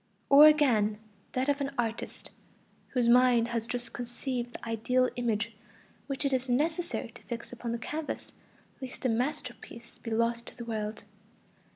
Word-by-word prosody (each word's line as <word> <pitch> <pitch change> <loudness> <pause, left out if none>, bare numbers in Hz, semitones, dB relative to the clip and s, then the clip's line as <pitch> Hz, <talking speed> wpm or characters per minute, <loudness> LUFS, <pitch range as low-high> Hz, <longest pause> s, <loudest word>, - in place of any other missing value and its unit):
Or 290 +2 +10
again, 235 -9 +4 0.4
that 255 +2 0
of 285 0 +1
an 275 - 0
artist, 230 -1 -3 0.6
whose 245 -3 +1
mind 240 -1 +5
has 230 -1 -2
just 245 0 -4
conceived 245 0 -3
the - - -8
ideal 250 +3 +2
image 230 -2 -1 0.5
which 275 0 -2
it 275 - +1
is 260 0 0
necessary 320 +7 0
to - - -14
fix 235 -1 -6
upon 235 -1 -4
the 235 - -1
canvas 300 +6 -5 0.5
lest 260 0 -7
a - - +4
masterpiece 240 -1 -4
be 230 - -6
lost 230 +1 0
to - - -11
the 235 - -6
world. 215 -2 -3
245 Hz, 160 wpm, -30 LUFS, 230-265 Hz, 0.6 s, Or